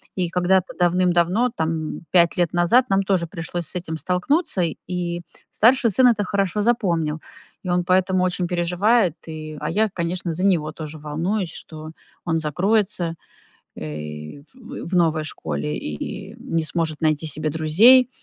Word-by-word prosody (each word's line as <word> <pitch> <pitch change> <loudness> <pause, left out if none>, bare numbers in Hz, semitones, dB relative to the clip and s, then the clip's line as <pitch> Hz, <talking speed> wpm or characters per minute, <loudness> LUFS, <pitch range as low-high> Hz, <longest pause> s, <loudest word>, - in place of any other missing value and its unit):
И 180 -2 -1
когда-то 180 +1 +1
давным-давно, 180 +5 +2
там, 160 -1 -2
5 170 -2 +4
лет 175 -2 +1
назад, 175 +9 +4
нам 195 0 +2
тоже 190 -3 +1
пришлось 170 0 -5
с - - -9
этим 160 -2 -6
столкнуться. 185 - 0 0.3
И 175 -1 -3 0.3
старший 235 0 +4
сын 250 +6 +5
это 220 -4 +3
хорошо 200 +1 -1
запомнил, 170 -9 0 0.5
и - - -3
он 180 0 +2
поэтому 185 +1 +2
очень 180 -1 0
переживает. 180 +3 +2
И, 155 -1 -7
а 150 - -3
я, 215 +1 +1
конечно, 170 0 -3
за 180 +4 -3
него 165 -6 +2
тоже 155 0 -8
волнуюсь, 165 +5 -2
что 155 -1 -9 0.3
он 165 -1 +1
закроется, 175 +2 0 0.6
э, 75 - -7
в 260 +1 -9
в 185 - -3
новой 160 -3 +2
школе 75 - -3
и 75 -1 -6
не 165 -1 -2
сможет 160 -1 -2
найти 155 0 +1
себе 155 +1 -2
друзей. 200 - +5
175 Hz, 150 wpm, -22 LUFS, 155-190 Hz, 0.6 s, сын